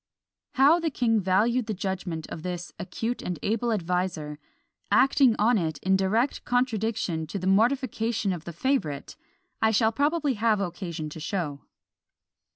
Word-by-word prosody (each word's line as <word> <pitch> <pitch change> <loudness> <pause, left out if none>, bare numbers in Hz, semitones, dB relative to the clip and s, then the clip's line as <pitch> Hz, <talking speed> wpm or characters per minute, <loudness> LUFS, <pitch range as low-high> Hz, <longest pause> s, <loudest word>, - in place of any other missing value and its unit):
How 290 +5 +5
the 330 -1 0
king 235 -5 +1
valued 215 +6 +2
the 215 - -2
judgment 185 -4 -4
of 160 - -6
this 175 0 -5
acute 225 +7 -3
and 180 -2 -4
able 230 +3 0
adviser, 180 -6 -2 0.5
acting 265 -3 +4
on 220 +1 +3
it 160 -3 -2
in 190 +1 +3
direct 215 +8 +1
contradiction 225 -7 0
and 160 -1 -6
to - - -3
the 185 - -5
mortification 225 0 +1
of 165 -2 -7
the 170 - -5
favourite, 165 - -1 0.5
I 220 - +4
shall 220 +1 +3
probably 290 +3 +1
have 220 -1 +2
occasion 175 -4 -4
to 160 - -8
show. 155 -4 -4
205 Hz, 155 wpm, -26 LUFS, 175-240 Hz, 0.5 s, How